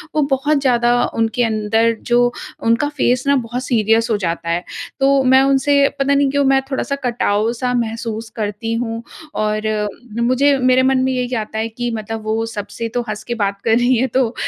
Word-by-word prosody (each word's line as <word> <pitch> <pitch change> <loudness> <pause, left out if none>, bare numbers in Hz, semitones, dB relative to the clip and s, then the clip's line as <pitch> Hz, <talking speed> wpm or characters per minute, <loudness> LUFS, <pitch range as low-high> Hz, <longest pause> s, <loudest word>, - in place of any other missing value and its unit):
वो 305 - +3
बहुत 290 +2 +1
ज़्यादा 240 -2 +2
उनके 225 +2 -1
अंदर 225 +1 +1 0.2
जो 245 0 +4 0.3
उनका 230 +6 +2
फेस 250 -1 +2
ना 280 - +4
बहुत 245 0 -3
सीरियस 225 0 +2
हो 215 - +2
जाता 170 0 -3
है। 170 +1 0 0.4
तो 275 0 +3
मैं 260 +1 +5
उनसे 275 +1 +2 0.2
पता 275 +1 +2
नहीं 280 0 +3
क्यों 285 0 +2
मैं 270 - +3
थोड़ा-सा 275 +1 -1
कटाव-सा 235 +1 0
महसूस 230 -1 -3
करती 220 +1 -3
हूँ 230 -1 -3 0.3
और 215 0 -1 0.5
मुझे 265 +4 +3
मेरे 255 0 +3
मन 265 0 +3
में 260 - +1
यही 250 0 -2
आता 220 -1 -4
है 225 - -1
कि 240 +2 -4
मतलब 220 0 -5
वो 220 +1 -1
सबसे 220 +3 -5
तो 245 - 0
हँस 210 0 -5
के 240 - -4
बात 200 0 -2
कर 225 0 +4
रही 245 +1 +3
हैं 260 +3 +1
तो 255 -3 +1
240 Hz, 190 wpm, -18 LUFS, 225-260 Hz, 0.5 s, मैं